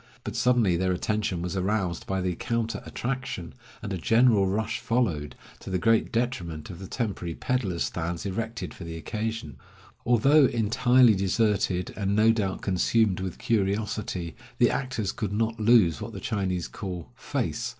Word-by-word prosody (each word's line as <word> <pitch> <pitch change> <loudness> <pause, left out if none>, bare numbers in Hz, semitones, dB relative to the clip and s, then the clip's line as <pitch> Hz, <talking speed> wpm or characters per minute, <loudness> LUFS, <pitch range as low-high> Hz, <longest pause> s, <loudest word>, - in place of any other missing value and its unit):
But - - -5
suddenly 120 -8 +3
their 95 +1 +1
attention 95 -1 -1
was 90 +2 -3
aroused 95 -2 -1
by 95 -1 -1
the 90 0 0
counter 115 +4 -2
attraction, 125 - -4 0.3
and 100 -2 -3
a 95 - -3
general 115 +1 +4
rush 110 +3 -1
followed, 90 -12 -1 0.2
to - - -9
the 95 - 0
great 115 +3 +2
detriment 90 -11 -2
of 85 - -10
the 95 - -7
temporary 95 -9 -3
peddlers' 120 -10 -1
stands 85 +2 -3
erected 110 +4 -4
for - - -10
the 85 -1 -6
occasion. 110 +6 -4 0.5
Although 135 +5 +5
entirely 120 +1 +4
deserted, 100 -2 +1
and 100 -1 0
no 110 +2 +5
doubt 100 -4 -2
consumed 100 +1 +2
with 95 -2 -4
curiosity, 100 -4 -1 0.2
the - - +4
actors 125 -7 -2
could 105 -2 -3
not 110 +1 -1
lose 105 -8 +4
what - - -6
the - - -6
Chinese 95 -5 -2
call 90 -4 -7
"face." - - -3
105 Hz, 160 wpm, -27 LUFS, 90-115 Hz, 0.5 s, Although